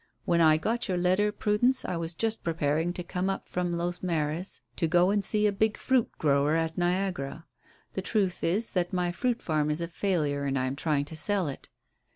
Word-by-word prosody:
"When 170 -1 +3
I 155 -1 +6
got 230 +10 -1
your 185 -2 0
letter, 185 +4 +2
Prudence, 215 +5 +1
I 180 - -2
was 165 0 -4
just 225 +2 -1
preparing 160 0 0
to 180 - -3
come 180 +2 -2
up 195 - -3
from 175 -1 -2
Los 175 +1 -3
Mares 165 0 -2 0.2
to 165 - +1
go 175 +3 +4
and 205 -1 +1
see 210 +2 +3
a 210 - +4
big 215 +2 +1
fruit 260 -3 +1
grower 145 0 +2
at 165 0 0
Niagara. 175 -4 -1 0.5
The 190 - -2
truth 195 -2 -1
is 200 +7 +1
that 175 -2 0
my 180 -1 0
fruit 245 +6 -1
farm 155 -2 0
is 150 +2 +1
a 170 - -2
failure 160 -6 -1
and 135 -1 0
I 130 - 0
am 130 +1 -2
trying 145 -1 0
to 160 - -9
sell 190 +3 0
it." 140 - -7
175 Hz, 210 wpm, -28 LUFS, 155-195 Hz, 0.5 s, I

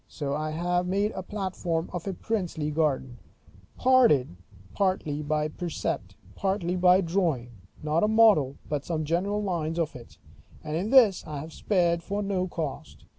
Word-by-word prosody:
So 140 -3 -4
I 155 +1 -2
have 175 +3 -1
made 200 +3 +1
a 190 - -5
platform 185 -4 -3
of 175 +1 -5
a 195 - -1
princely 175 -8 -2
garden, 135 -5 -1 0.6
partly 145 - +1
by 150 0 0
precept, 170 +1 -4 0.2
partly 190 -3 -1
by 180 +1 +5
drawing, 165 -9 -1 0.3
not 155 +4 +1
a - - +4
model, 215 -12 +4
but 145 -2 -2
some 155 -1 -2
general 195 +6 0
lines 165 -4 -2
of 165 -2 -1
it; 120 -2 -12 0.5
and 155 -1 -4
in 185 +6 -1
this 230 -8 +6
I 150 -1 -5
have 160 +1 -9
spared 170 -3 +1
for 200 +4 -3
no 190 -2 -1
cost. 160 -6 -6
170 Hz, 155 wpm, -27 LUFS, 150-195 Hz, 0.6 s, this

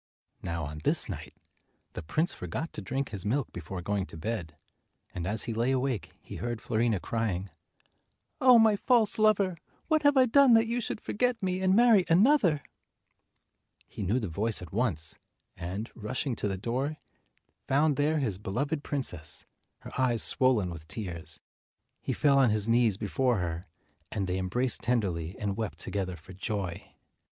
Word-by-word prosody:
Now 85 -1 -3
on 75 +1 -7
this - - +2
night, - - -7 0.6
the - - -5
prince 155 - 0
forgot 110 - -5
to - - -5
drink 130 +8 -3
his 100 -4 -5
milk 120 +5 -1
before 90 +2 -6
going 100 0 -1
to - - -10
bed, 85 -5 -4 0.6
and 90 -1 -4
as 105 +2 0
he 115 - -3
lay 115 +3 0
awake 130 - -1
he - - -9
heard 120 -1 -3
Fiorina 115 -2 0
crying, 100 -3 -2 0.9
"Oh, 255 -2 +7
my 220 -2 +5
false 225 0 +2
lover! 200 -4 +3 0.3
What 310 -1 +3
have 285 -1 +4
I 260 - +7
done 255 0 +6
that 225 0 +5
you 235 +2 -1
should 215 - -4
forget 240 0 -1
me 185 0 -1
and 190 0 +3
marry 230 -4 +6
another?" 180 - +4 1.2
He - - -8
knew 100 +5 +1
the 110 - -3
voice 105 +6 +1
at 90 -2 -10
once, 95 - -1 0.4
and, 95 +6 -5
rushing 125 +3 -3
to - - -1
the 95 -1 -2
door, 130 +9 -2 0.7
found 145 +2 +3
there 150 +3 +1
his 110 -10 -1
beloved 140 +10 -2
princess, 90 - -2 0.4
her - - -10
eyes 120 -3 +2
swollen 120 -9 +3
with 80 -2 -9
tears. 85 -1 -6 0.6
He - - -3
fell 140 -2 +4
on 130 -3 +5
his 105 0 0
knees 115 -3 +3
before 120 +3 +1
her, 90 0 -3 0.4
and 100 -3 -1
they 90 0 -2
embraced 120 +8 0
tenderly 95 -8 -1
and 100 -2 -2
wept 110 -1 -4
together 95 -3 -3
for 90 +3 -13
joy. 95 -2 -4
115 Hz, 170 wpm, -29 LUFS, 95-150 Hz, 1.2 s, Oh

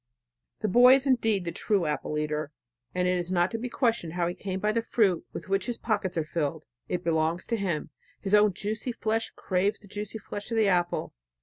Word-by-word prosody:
The 215 - +1
boy 245 +6 +8
is 270 0 +2
indeed 225 -8 +2
the 170 - -2
true 200 -2 0
apple 150 0 -2
eater, 150 -1 -2 0.4
and 180 0 +1
is 180 0 0
not 175 0 +2
to 225 - -3
be 250 +2 -4
questioned 230 - 0
how 175 -1 0
he 175 - -2
came 190 0 -4
by 210 +2 +1
the 230 +1 +1
fruit 205 -7 +1
with - - -7
which 195 +4 0
his 240 - -2
pockets 205 -6 -1
are 165 - +2
filled. 155 -1 -2 0.2
It 180 0 -2
belongs 165 +1 +1
to 235 - -1
him...His 190 0 -4
own 210 -1 +6
juicy 220 +5 -3
flesh 225 0 -1
craves 190 +2 0
the 205 - -14
juicy 205 +2 -5
flesh 205 0 -7
of 230 - -1
the 220 -2 +4
apple. 175 -2 +1
195 Hz, 210 wpm, -28 LUFS, 175-220 Hz, 0.4 s, boy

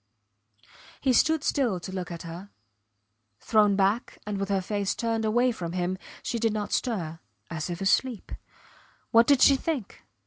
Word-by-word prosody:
He 265 -2 +2
stood 315 +4 +3
still 240 -10 +1
to 180 - -7
look 185 -1 -4
at 170 -1 -7
her. 170 +4 -8 0.9
Thrown 210 -2 +3
back 200 +5 0
and 205 -1 -3
with 195 0 -2
her 195 -1 +2
face 200 +1 -2
turned 225 -1 -1
away 240 +3 +3
from 175 -7 -5
him, 185 +1 -2 0.2
she 235 - -2
did 225 -1 +1
not 210 -1 -3
stir 170 -10 -2 0.3
as 160 +1 -3
if 175 +1 -5
asleep. 225 +4 +1 0.8
What 230 +1 +6
did 280 -3 +5
she 275 - +7
think? 270 - -4
210 Hz, 165 wpm, -27 LUFS, 185-240 Hz, 0.9 s, she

